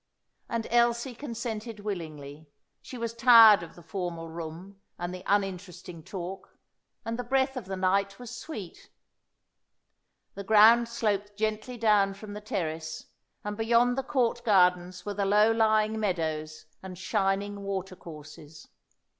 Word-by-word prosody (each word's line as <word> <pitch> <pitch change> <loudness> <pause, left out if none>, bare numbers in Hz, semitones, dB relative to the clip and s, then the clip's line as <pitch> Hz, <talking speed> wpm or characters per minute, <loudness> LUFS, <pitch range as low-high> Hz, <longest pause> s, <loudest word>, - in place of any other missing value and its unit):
And 230 -1 -2
Elsie 235 +1 +2
consented 230 -4 -6
willingly; 155 -7 -7 0.3
she 255 - -9
was 230 -1 -3
tired 230 -4 +8
of 170 - -10
the 175 - -14
formal 170 -1 -5
room 170 +4 -9 0.2
and 175 +1 -4
the 185 - -7
uninteresting 185 -3 -2
talk, 185 +2 -8 0.5
and 230 +1 -3
the - - -2
breath 265 +2 +1
of 250 -6 -5
the 190 0 -4
night 195 +1 +1
was 245 -1 -9
sweet. 230 - -9 1.4
The 200 - -7
ground 220 +3 +6
sloped 205 -3 -2
gently 215 +3 -2
down 205 -3 +3
from 205 +1 -9
the 210 - -7
terrace, 160 -6 -4 0.4
and 210 0 -4
beyond 235 +3 +2
the 270 - -1
Court 245 -3 0
gardens 180 -4 +2
were 205 - -3
the 200 0 -1
low 210 +2 +4
lying 220 -1 +2
meadows 155 -5 -3 0.2
and 185 -1 -9
shining 200 +2 -1
watercourses. 165 -6 -8
200 Hz, 140 wpm, -28 LUFS, 180-230 Hz, 1.4 s, tired